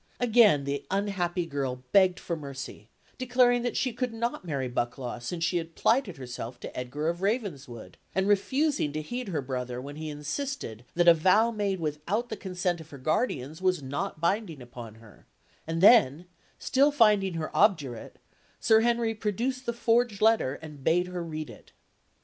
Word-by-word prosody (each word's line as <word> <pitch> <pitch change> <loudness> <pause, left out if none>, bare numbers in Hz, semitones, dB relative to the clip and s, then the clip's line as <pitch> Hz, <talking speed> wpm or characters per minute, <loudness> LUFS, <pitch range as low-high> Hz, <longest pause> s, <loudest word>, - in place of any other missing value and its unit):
Again 225 - +5
the 140 0 -3
unhappy 190 -3 -1
girl 135 -5 -3
begged 185 -2 +4
for 170 - -3
mercy, 135 -7 -8 0.3
declaring 250 -1 +3
that 245 -1 -2
she 255 -3 0
could 250 -2 -3
not 235 -2 -2
marry 140 -7 -2
Bucklaw 120 0 -3
since 165 +7 -4
she 170 +1 +1
had 165 -1 -5
plighted 225 - +1
herself 125 -1 -7
to - - -8
Edgar 130 +5 -3
of 170 +2 -2
Ravenswood, 145 - -3 0.2
and 190 +1 +1
refusing 260 - +1
to 155 - -2
heed 245 +7 -5
her 160 -7 -2
brother 125 -1 -4
when 140 +3 -8
he 155 0 -5
insisted 150 - -5
that 175 0 +2
a 170 - +10
vow 190 +8 +3
made 200 -4 -1
without 165 +10 -2
the 220 - -3
consent 180 -3 -2
of 160 - -14
her 140 - -10
guardians 155 - -1
was 185 -5 +1
not 145 +7 -4
binding 170 -2 -1
upon 120 -3 -10
her; 115 -3 -18 0.4
and 165 +1 -2
then, 180 - +6 0.3
still 280 +3 +3
finding 210 -8 +3
her 160 -1 -4
obdurate, 140 - +1 0.4
Sir 220 0 +5
Henry 235 -1 +1
produced 235 +5 -2
the - - +2
forged 235 -2 +1
letter 220 -12 +3
and 150 -3 -10
bade 175 +4 +3
her 180 -1 -4
read 155 -2 -6
it. - - -16
175 Hz, 175 wpm, -28 LUFS, 140-220 Hz, 0.4 s, a